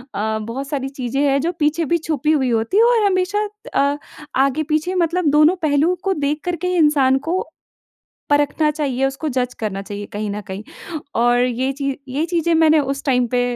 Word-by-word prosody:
अ, 220 +1 -1
बहुत 240 +6 -5
सारी 270 -1 -3
चीज़ें 270 0 -3
हैं, 280 -1 +3
जो 335 +4 0
पीछे 305 +2 +1
भी 340 +4 +2
छुपी 305 -2 -1
हुई 270 -5 +2
होती 230 - 0
हैं 450 - +6
और 470 -3 +4
हमेशा 405 +2 +1 0.3
अ, 280 +1 +2 0.4
आगे-पीछे 310 +6 +1
मतलब 345 0 +1
दोनों 305 +4 +5
पहलूओं 310 +4 +2
को 390 - +1
देख 295 -1 -1
कर 355 - 0
के 360 +2 -4
ही 365 - 0
इंसान 285 -5 +4
को 365 +3 +1 0.9
परखना 290 +1 +2
चाहिए, 275 -4 -1
उसको 270 +3 -3
जज 250 -2 -1
करना 205 -3 -3
चाहिए 205 +1 -7
कहीं 210 +1 -3
न 205 +1 -4
कहीं 190 +2 -6 0.6
और 240 0 +4
ये 255 +2 -1
चीज़ 275 -1 -3
ये 290 +5 -1
चीज़ें 340 -1 +1
मैंने 320 -1 +5
उस 275 0 -3
टाइम 250 -3 +2
पे 250 - +2
290 Hz, 195 wpm, -20 LUFS, 255-325 Hz, 0.9 s, हैं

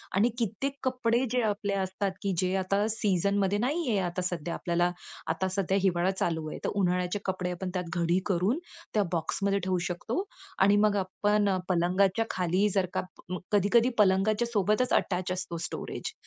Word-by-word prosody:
आणि 210 +5 +4
कित्येक 245 +5 -2
कपडे 250 -1 +1
जे 250 0 +2
आपले 205 -1 -2
असतात, 190 0 -1
की 200 -1 0
जे 185 +1 +1
आता 195 +2 +1
सीझनमध्ये 200 -1 +1
नाहीये, 255 -2 0
आता 180 0 -2
सध्या 175 -2 -2
आपल्याला 175 0 0 0.4
आता 190 +3 -1
सध्या 195 0 +1
हिवाळा 180 0 +2
चालू 160 -4 -2
आहे - - -6
तर - - +1
उन्हाळ्याचे 180 +1 0
कपडे 185 -1 -1
आपण 180 +1 -4
त्यात 180 -2 -3
घडी 170 +2 +2
करून 195 - +1 0.3
त्या 210 - +3
बॉक्समध्ये 195 +4 0
ठेवू 185 -1 0
शकतो. 230 - -2 0.4
आणि 200 +1 +5
मग 205 - 0
आपण 205 0 +1
पलंगाच्या 185 +4 +2
खाली 185 +3 +1
जर 190 -2 +2
का - - 0 0.5
कधी-कधी 210 +4 +4
पलंगाच्या 210 +3 +3
सोबतच 215 +3 +1
अटॅच 185 -1 +1
असतो 180 -2 -3
स्टोरेज - - -5
195 Hz, 160 wpm, -29 LUFS, 180-210 Hz, 0.5 s, आणि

